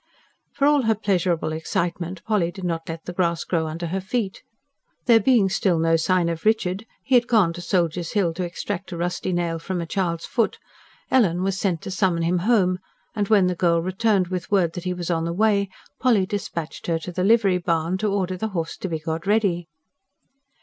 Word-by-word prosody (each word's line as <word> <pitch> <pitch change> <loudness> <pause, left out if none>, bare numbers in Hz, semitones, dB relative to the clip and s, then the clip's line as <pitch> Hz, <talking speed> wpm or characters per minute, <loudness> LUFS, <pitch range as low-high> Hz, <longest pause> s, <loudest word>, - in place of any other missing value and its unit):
For 280 - +1
all 295 -1 +5
her 220 0 +3
pleasurable 180 -6 0
excitement 170 +2 -3
Polly 210 -6 +1
did 190 +1 -9
not 165 -2 -3
let 165 0 -6
the 180 - -5
grass 170 -2 0
grow 165 -3 -1
under 165 +2 -4
her 190 +3 -2
feet. 195 0 -3 0.6
There 230 -2 +6
being 225 -3 +4
still 190 -2 +1
no 165 0 +3
sign 175 +1 +2
of 165 -1 -3
Richard 215 -1 +1 0.2
he 265 - -2
had 240 -1 +5
gone 205 -9 +3
to 175 - -7
Soldiers' 170 -1 -1
Hill 190 -6 +1
to 180 +2 -3
extract 175 +1 -5
a 170 - -4
rusty 175 +2 -2
nail 170 -2 -1
from 180 +2 -3
a 170 - -3
child's 170 -1 -2
foot 230 -4 0 0.5
Ellen 185 -9 +3
was 195 0 -1
sent 180 -5 -1
to - - -5
summon 185 -3 +1
him 175 +2 +1
home; 185 -3 +2 0.4
and 205 -2 0
when 205 -3 +5
the 180 - +1
girl 170 -1 +2
returned 190 +1 +1
with 180 -2 -4
word 180 -5 +2
that 175 - -7
he 180 - 0
was 175 0 -3
on 165 -1 0
the 170 - -2
way, 200 0 +2 0.3
Polly 230 -7 +3
dispatched 170 -5 -5
her 165 -1 +1
to 165 +2 -7
the 180 +1 -2
livery 200 -3 +4
barn, 170 +1 0
to 210 0 0
order 185 -2 -1
the 220 - -2
horse 165 0 -3
to 190 - -4
be 160 - -1
got 160 +3 -4
ready. 195 -5 +1
180 Hz, 210 wpm, -23 LUFS, 170-200 Hz, 0.6 s, There